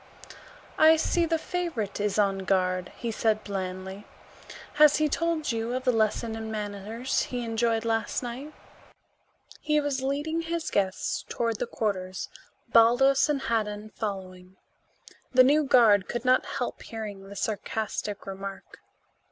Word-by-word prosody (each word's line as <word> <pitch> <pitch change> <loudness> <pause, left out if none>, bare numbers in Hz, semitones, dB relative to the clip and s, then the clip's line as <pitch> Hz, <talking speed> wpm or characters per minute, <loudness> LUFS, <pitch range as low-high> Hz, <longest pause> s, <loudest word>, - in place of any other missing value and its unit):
"I 315 +1 +8
see 335 +1 +1
the 325 0 +1
favorite 320 - -3
is 205 0 0
on 195 -2 +2
guard," 185 -1 0
he 235 -2 -4
said 215 -1 0
blandly. 190 0 -5 0.7
"Has 300 -1 +8
he 310 - +2
told 330 -1 0
you 230 +2 -2
of 255 - -3
the 255 - +3
lesson 220 0 0
in 220 0 -5
manners 215 +4 -2
he 245 -1 -3
enjoyed 225 0 0
last 225 +2 -1
night?" 250 +5 -6 1.1
He 300 0 +1
was 285 -3 -1
leading 290 +5 -1
his 330 -1 -3
guests 190 -1 -1
toward 230 -2 -1
the 245 - -2
quarters, 190 -5 -3 0.4
Baldos 265 +5 +5
and 285 -2 0
Haddan 215 -3 -2
following. 190 -3 -6 0.8
The 255 0 +8
new 295 +3 +4
guard 220 -7 +5
could 240 +1 -3
not 255 0 +3
help 250 - -3
hearing 205 -3 -7
the 200 - -9
sarcastic 210 -1 -3
remark. 195 0 -8
225 Hz, 140 wpm, -27 LUFS, 200-270 Hz, 1.1 s, I